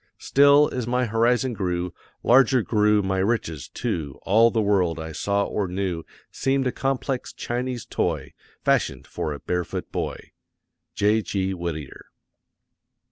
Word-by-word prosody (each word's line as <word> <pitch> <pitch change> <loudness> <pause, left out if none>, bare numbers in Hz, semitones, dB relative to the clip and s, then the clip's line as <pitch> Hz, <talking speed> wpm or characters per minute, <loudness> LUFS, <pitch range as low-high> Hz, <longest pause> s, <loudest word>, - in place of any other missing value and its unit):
Still, 145 +1 +5
as 125 -3 -3
my 125 +1 +1
horizon 120 +3 +2
grew, 90 -3 -2 0.3
larger 130 0 +5
grew 105 -1 +3
my 95 0 0
riches, 90 - -1
too; 85 - -3
all 115 +4 +5
the 115 - 0
world 95 -6 +2
I 80 0 -6
saw 100 +6 0
or 100 -1 -2
knew 90 -2 -2 0.3
seemed 135 0 0
a 125 - +1
complex 135 -1 -2
Chinese 125 0 -3
toy, - - -2 0.3
fashioned - - +1
for 75 - -4
a 70 - -5
barefoot 90 -1 -3
boy! - - -4 0.6
J.G. 100 -2 +1
WHITTIER. 85 -5 -6
105 Hz, 135 wpm, -24 LUFS, 90-125 Hz, 0.6 s, Still